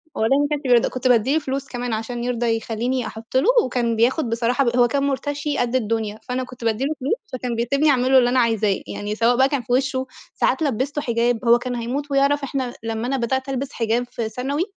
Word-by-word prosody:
والله 270 +6 +2
ما 290 - +2
كانش 295 -1 -1
بيرضى 245 -3 +4
كنت 255 0 -2
بادّي 250 +3 +3
له 320 - +3
فلوس 275 -1 -4
كمان 245 -2 -4
عشان 235 +2 -4
يرضى 235 -2 0
يخلّيني 235 +3 -2
أحط 225 +3 -4
له، 300 - +2 0.2
وكان 235 -2 0
بياخد 240 +3 +1
بصراحة 240 +4 +1
ب 240 +1 0
هو 240 -1 +5
كان 280 +3 0
مُرتشي 290 +1 -2
قد 245 0 0
الدنيا، 220 -3 -1
فأنا 255 +1 -3
كنت 250 -1 -11
بادّي 225 +3 0
له 310 - 0
فلوس 275 +10 0 0.2
فكان 250 -2 -3
بيسيبني 275 +6 +1
اعمل 260 -2 +2
له 265 - +7
اللي 245 -1 +3
أنا 255 - +2
عايزاه، 220 -4 +1
يعني 205 +1 -4
سواء 235 +2 +2
بقى 265 +1 +4
كان 280 -4 -1
في 245 +1 -3
وشه، 260 0 0 0.3
ساعات - - +1
لبّسته 280 +2 -1
حجاب 235 0 0
هو 235 +1 +6
كان 250 0 -4
هموت 265 +5 -3
ويعرف 280 +1 +2
إحنا 260 -2 -3
لمّا 225 +1 -3
أنا 270 +1 0
بدأت 260 +3 -1
ألبس 270 +1 -3
حجاب 235 +1 0
في 225 -2 -3
ثانوي 275 +7 -2
250 Hz, 230 wpm, -22 LUFS, 230-270 Hz, 0.3 s, له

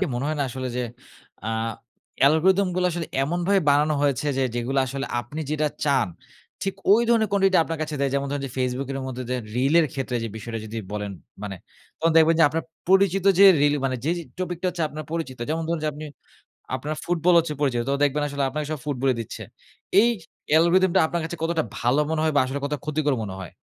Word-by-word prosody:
কি 195 - +2
মনে 125 +3 -2
হয় 155 - -1
না? - - +2
আসলে 130 +1 -4
যে 125 - 0 0.7
আ - - -1 0.7
অ্যালগরিথম 180 +7 +4
গুলা 180 - +2
আসলে 170 -1 -3 0.2
এমনভাবে 175 +5 +1
বানানো 150 +2 +3
হয়েছে 145 0 +1
যে - - +2
যেগুলা 125 +3 0
আসলে 135 +2 -4
আপনি 145 +7 -7
যেটা 155 0 +1 0.2
চান, 140 -10 +2 0.5
ঠিক 195 -1 -1 0.2
ওই 230 +3 +5
ধরনের 225 -3 +3
quantity 195 -1 +3
টা - - +7
আপনার 165 -1 -4
কাছে 155 -1 -4
দেয়। 140 -1 +1
যেমন 140 0 0
ধরেন 145 -1 -2
যে - - -8
ফেসবুকের 130 +2 -2
মধ্যে 130 -1 -5
দে 125 - 0 0.2
রিল 135 +5 +2
এর 160 - +2
ক্ষেত্রে 130 -2 -2
যে - - -3
বিষয়টা 115 +1 -5
যদি 110 +2 -7 0.2
বলেন, 105 -1 -3 0.3
মানে 100 -2 -5 0.4
তখন 165 0 +2
দেখবেন 165 0 +6
যে - - +8
আপনার 160 +2 -3 0.2
পরিচিত 195 0 +4
যে 200 - +9 0.2
রিল 145 0 +4
মানে 130 -1 0
যে, 160 - +1
যে - - -5 0.2
টপিক 180 -2 -3
টা - - +1
হচ্ছে 170 -2 -4
আপনার 155 0 -7
পরিচিত। 160 -6 -4
যেমন 165 +1 -1
ধরুন 170 -1 -1
যে - - +1
আপনি 155 +1 -7 0.7
আপনার 150 +4 -4
ফুটবল 175 0 +2
হচ্ছে 160 -2 -2
পরিচিত, 125 -5 +1
তো 140 - +2
দেখবেন 145 +1 +1
আসলে 140 -1 -2
আপনাকে 150 +2 -3
সব 155 - -3
ফুটবলই 135 -2 +1
দিচ্ছে। 110 - -8 0.6
এই 235 - +4 0.4
অ্যালগরিথম 170 +4 +4
টা - - +6
আপনার 170 0 -2
কাছে 170 +1 -6
কতটা 165 -1 +1 0.2
ভালো 125 +6 +2
মনে 160 -1 0
হয় 155 - +1
বা - - +6
আসলে 135 +2 -3
কতটা 145 -1 -2
ক্ষতিকর 150 -2 0
মনে 95 -2 -6
হয়? 90 -3 -8
150 Hz, 220 wpm, -24 LUFS, 135-165 Hz, 0.7 s, যে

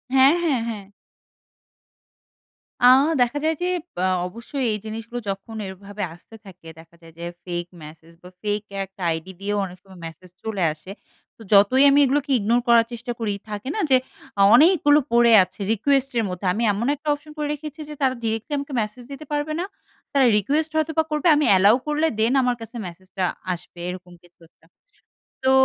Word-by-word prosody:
হ্যাঁ, 270 +3 +7
হ্যাঁ, 285 -8 +1
হ্যাঁ। 210 -4 -6 2.0
আ - - +8 0.3
দেখা 245 +4 +1
যায় 320 +1 +1
যে, 360 - 0 0.3
পা 180 - -1 0.2
অবশ্যই 235 +7 -5
এই 210 - -3
জিনিসগুলো 225 +2 -6
যখন 195 +3 -6
এভাবে 200 +2 -7
আসতে 175 +6 -16
থাকে 180 -3 -14
দেখা 165 +1 -17
যায় 165 -1 -16
যে, 170 - -5 0.2
fake 175 0 -4
message 160 +2 -14
বা, 180 - -11
ফেক 210 0 -1 0.2
একটা 195 0 -18
আইডি 160 +3 -5
দিয়েও 205 +1 -1
অনেক 180 -1 -10
সময় 190 -2 -15
মেসেজ 165 +3 -11
চলে 210 -4 -2
আসে। 155 +5 -12 0.5
তো - - -17
যতই 205 +7 +6
আমি 280 +1 +5
এগুলোকে 285 +2 0
ইগনোর 230 +4 +2
করার 235 -1 +5
চেষ্টা 240 +1 -5
করি, 215 -3 -1 0.2
থাকে 210 +5 -5
না? - - -2
যে 260 - +7 0.4
অ - - +5
অনেকগুলো 300 0 +5
পড়ে 235 0 +5
আছে 185 +3 -13
রিকোয়েস্টের 265 0 +1
মধ্যে 180 +1 -6
আমি 225 +5 -2
এমন 230 +6 -2
একটা 300 +2 -15
অপশন 295 +1 -9
করে 300 -1 -2
রেখেছি 300 +1 -8
যে - - -6
তারা 260 -1 +2
ডিরেক্টলি 225 +5 -3
আমাকে 280 0 -5
মেসেজ 215 +4 -6
দিতে 290 +3 -8
পারবে 295 +1 -1
না। 360 - -1 0.5
তারা 275 -2 +4
রিকোয়েস্ট 300 +9 0
হয়তোবা 320 0 +1
করবে, 300 +3 0
আমি 295 - +2
allow 200 +4 +6
করলে 300 +1 +1
দ্যান 230 +4 +2
আমার 250 -1 +1
কাছে 225 +2 -10
মেসেজটা 185 +2 -7 0.3
আসবে, 175 0 -11
এরকম 180 0 -9
কিছু 175 0 -24
একটা। - - -31 0.8
তো 260 - +3
225 Hz, 180 wpm, -23 LUFS, 190-280 Hz, 2.0 s, আ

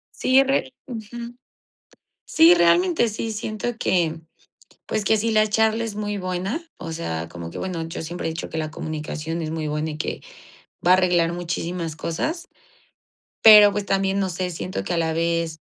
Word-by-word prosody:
Sí, 265 +1 +4
re 270 0 0
Ujú, 235 0 -8 0.9
sí, 325 +2 +6
realmente 175 +5 +3
sí 225 +1 -4
siento 215 +2 -4
que, 165 -3 +1 0.7
pues 215 - -2
que 220 +2 +3
sí, 225 +2 0
la 215 0 +4
charla 220 +2 +2
es 220 -3 -5
muy 205 -1 -3
buena. 185 - -3 0.2
O - - -7
sea, 85 - -4
como 85 0 -8
que, - - -9
bueno, 180 -3 -3
yo 165 - -6
siempre 175 +2 -4
he 160 - -1
dicho 165 - -6
que - - -5
la 155 -1 -3
comunicación 155 +2 -5
es 155 - -3
muy 160 -1 -3
buena 150 +1 -2
y 150 - -7
que 155 - -4 0.7
va 180 - +7
a - - +9
arreglar 175 -2 +2
muchísimas 170 -1 -4
cosas. 315 - -3 0.9
Pero, 210 -2 +10
pues 205 -1 -3
también, 195 0 +1
no 195 - 0
sé, 180 +1 -3
siento 180 +2 -4
que 175 - -2
a - - 0
la 160 -1 0
vez, 165 -1 -1
180 Hz, 185 wpm, -23 LUFS, 165-215 Hz, 0.9 s, Pero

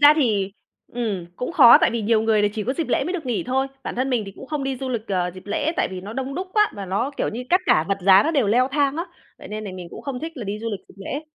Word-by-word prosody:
ra 290 +1 +8
thì, 210 -9 +1 0.4
ừm, 215 -7 -3
cũng 250 - -4
khó, 250 -8 +9
tại - - +4
vì 235 -1 -2
nhiều 220 +1 +2
người 220 -2 +3
là 205 - +4
chỉ 215 - -3
có 255 - 0
dịp 320 0 -3
lễ - - +1
mới 355 - -2
được 335 -7 -4
nghỉ 240 -4 -1
thôi. 265 +2 +1 0.2
Bản - - -4
thân 260 +2 0
mình 245 -3 +1
thì 195 - -8
cũng - - -10
không 290 -1 -3
đi 270 -1 -2
du 265 +1 -5
lịch, 235 -3 -3
ờ, 180 -2 0
dịp 185 - -12
lễ, 295 +10 -1
tại - - +1
vì 185 -1 -6
nó 200 +3 -8
đông 265 +3 -4
đúc 370 +4 -3
quá, 420 -1 +3
và 200 - -5
nó, 200 +9 -1
kiểu - - 0
như, 240 +3 -5
các 360 +2 +5
cả 155 - +4
vật 195 0 0
giá 190 +1 +7
nó 315 - 0
đều 280 -9 +2
leo 245 +5 +3
thang 285 -1 +1
á, 335 - -2 0.3
vậy - - -11
nên 215 +1 -5
nà 200 - -5
mình 180 -2 -7
cũng - - -9
không 265 -3 -4
thích 325 +1 -5
là 240 - -5
đi 205 +1 -3
du 230 +1 -4
lịch 205 - -4
dịp - - -17
lễ. 285 +8 -4
240 Hz, 325 wpm, -23 LUFS, 205-275 Hz, 0.4 s, khó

